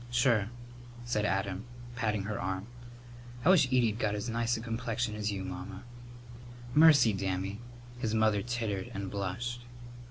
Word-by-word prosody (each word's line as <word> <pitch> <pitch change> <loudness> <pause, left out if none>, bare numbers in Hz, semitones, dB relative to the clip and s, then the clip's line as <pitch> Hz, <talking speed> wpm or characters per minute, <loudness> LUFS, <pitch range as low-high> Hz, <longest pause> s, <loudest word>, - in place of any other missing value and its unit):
"Sure," 120 -4 +3 0.6
said 105 -3 0
Adam, 95 0 -1 0.3
patting 105 -4 0
her 105 0 -3
arm. 95 +1 -2 0.8
"I - - +6
wish 170 -8 +6
Edie'd 120 -4 +2
got 105 -2 +1
as 105 +3 -3
nice 115 +1 +1
a - - -5
complexion 115 0 -2
as 105 0 -1
you, 95 -2 -3
Mamma." 95 +1 -7 0.9
"Mercy, 145 -7 +7
Dammy!" 95 +1 -2 0.4
his 110 -3 -1
mother 110 -2 +3
tittered 110 -4 -2
and 100 -1 -4
blushed. 105 +5 -3
110 Hz, 145 wpm, -31 LUFS, 100-120 Hz, 0.9 s, Mercy